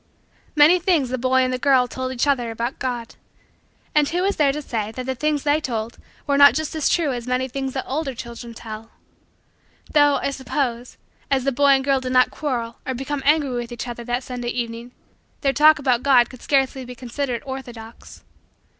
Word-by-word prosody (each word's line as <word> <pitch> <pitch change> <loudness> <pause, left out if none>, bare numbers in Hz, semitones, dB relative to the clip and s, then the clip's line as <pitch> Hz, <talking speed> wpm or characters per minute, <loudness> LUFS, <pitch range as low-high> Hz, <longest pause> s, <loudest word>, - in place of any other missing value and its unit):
Many 310 +5 +6
things 340 -8 +1
the 255 0 -2
boy 260 +1 +3
and 255 0 -1
the 255 - -2
girl 260 -2 +3
told 260 +1 -4
each 255 0 0
other 260 -5 +1
about 235 +3 -4
God. 240 -3 -4 0.8
And 300 -1 +3
who 355 +2 -1
is 400 +1 0
there 290 -3 +4
to 295 - -4
say 220 -7 -3
that 255 +3 -6
the 265 - -1
things 295 +2 -1
they 295 +1 +2
told 230 -4 -4 0.3
were 280 -1 +1
not 285 0 +8
just 315 -1 -2
as 315 -2 0
true 315 -6 +1
as 240 0 -6
many 255 +1 0
things 265 0 -4
that 265 - -3
older 275 -1 -3
children 235 0 -8
tell? 220 0 -9 1.0
Though, 290 -1 +5
I 275 - -1
suppose, 255 -2 -3 0.3
as 270 -2 +1
the 275 - +1
boy 280 +2 +2
and 265 0 +2
girl 275 0 +2
did 255 0 -4
not 255 0 +4
quarrel 240 -6 -3
or 260 - -3
become 270 +3 -3
angry 295 -2 +3
with 240 -1 -4
each 240 +1 -5
other 240 0 -6
that 245 +2 -2
Sunday 245 -1 -5
evening, 235 0 -4 0.5
their 275 -2 +1
talk 310 +2 +6
about 255 -4 +1
God 255 -4 +4
could 255 - -13
scarcely 270 -1 +1
be 250 0 -9
considered 250 0 -4
orthodox. 240 -4 -9
260 Hz, 205 wpm, -22 LUFS, 240-285 Hz, 1.0 s, not